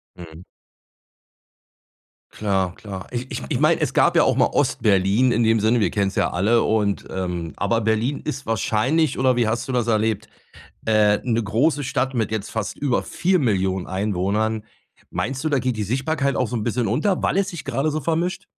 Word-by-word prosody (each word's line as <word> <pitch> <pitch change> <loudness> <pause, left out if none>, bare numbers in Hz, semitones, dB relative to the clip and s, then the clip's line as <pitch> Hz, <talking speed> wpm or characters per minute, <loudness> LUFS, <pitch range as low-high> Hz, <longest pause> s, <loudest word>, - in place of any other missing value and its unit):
Mhm. 85 -1 -11 1.9
Klar, 95 -3 -1
klar. 95 -3 -8
Ich 125 +1 -4
ich - - -4
ich - - -1
meine, - - +3
es - - 0
gab - - +3
ja - - +6
auch - - +2
mal - - +4
Ostberlin 105 +4 +2
in 120 0 +2
dem 115 0 +3
Sinne, 110 +3 +2
wir 105 - +2
kennen's 100 -1 -1
ja - - +1
alle 110 +6 +2
und 105 -2 0
ähm, 90 -3 -4
aber 115 +3 0
Berlin 110 +6 0
ist 140 -2 -5
wahrscheinlich, 125 +7 +1
oder 130 -1 +3
wie 120 -2 +2
hast 115 +2 -2
du - - -3
das 120 -2 0
erlebt, 110 -1 0 0.6
äh 105 -2 +3
'ne 115 -2 0
große 140 +8 +1
Stadt 135 -1 -1
mit 110 -3 -1
jetzt 110 -2 -3
fast 110 -2 -4
über 135 -4 0
4.000.000 100 - 0
Einwohnern. 105 +3 -1 0.5
Meinst 135 +3 -3
du, 155 - 0
da 140 -3 +2
geht 125 -2 -2
die 105 - -1
Sichtbarkeit 135 +5 -1
auch 125 - 0
so 125 - -4
'n 110 - -2
bisschen 120 0 -1
unter, 160 - 0
weil - - +1
es 195 0 +1
sich 170 -8 -7
grade 135 +6 -1
so 155 +1 -2
vermischt? 170 +4 -1
115 Hz, 190 wpm, -22 LUFS, 105-130 Hz, 1.9 s, ja